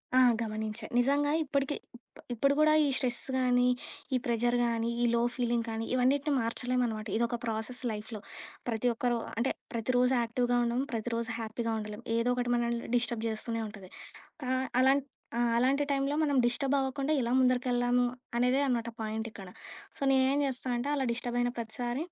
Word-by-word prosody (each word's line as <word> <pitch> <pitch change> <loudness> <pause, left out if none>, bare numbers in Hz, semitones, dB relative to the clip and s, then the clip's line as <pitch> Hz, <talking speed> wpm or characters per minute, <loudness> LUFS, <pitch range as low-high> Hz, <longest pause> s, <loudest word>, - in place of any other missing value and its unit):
ఆ! - - +7 0.2
గమనించా. 215 0 -3
నిజంగా 285 +3 +2
ఇప్పటికి 280 0 -1 0.6
ఇప్పుడు 275 +4 +2
గూడా 305 0 +5
ఈ - - +3
స్ట్రెస్ 245 -2 -1
గానీ 250 -1 +3 0.5
ఈ - - +4
ప్రెజర్ 240 0 +1
గానీ 230 -1 0
ఈ - - +4
లో 235 - +2
ఫీలింగ్ 240 -2 0
కానీ 225 0 -3
ఇవన్నిటిని 275 +4 +2
మార్చలేం 250 +2 -1
అనమాట. 220 -1 -4
ఇదొక 235 +1 0
ప్రాసెస్ 225 +2 -3
లైఫ్‌లో. 215 +1 -6 0.5
ప్రతి 230 +1 0
ఒక్కరు 240 +1 0 0.2
అంటే 240 +4 +1 0.2
ప్రతిరోజు 250 +2 +2
యాక్టివ్‌గా 245 +1 +1
ఉండం. 235 +1 0
ప్రతిరోజు 230 0 -2
హ్యాపీగా 225 +1 -2
ఉండలేం. 210 +2 -7
ఏదోకటి 245 +1 +1
మనల్ని 235 0 -1
డిస్టర్బ్ 235 -2 0
జేస్తూనే 225 +1 -2
ఉంటది. 200 -3 -11 0.5
కా 250 - -3 0.3
అలాం 270 +2 +5 0.4
ఆ! - - +1 0.2
అలాంటి 265 +4 +3
టైమ్‌లో 275 +1 +1
మనం 290 -2 +1
డిస్టర్బవ్వకుండా 270 +3 +1
ఎలా 235 0 -1
ముందరికెళ్లాము 245 -1 +2 0.3
అనేదే 250 +3 +3
అనమాట 235 -3 0
పాయింటిక్కడ. 220 -2 -4 0.5
సో, - - -16
నేనేం 265 +1 +3
జేస్తా 260 -1 -3
అంటే 240 +4 -2
అలా 275 - 0
డిస్టర్బ్ 240 +1 -2
అయిన 245 0 +2
ప్రతిసారి 240 +4 -3
240 Hz, 150 wpm, -30 LUFS, 230-255 Hz, 0.6 s, ఆ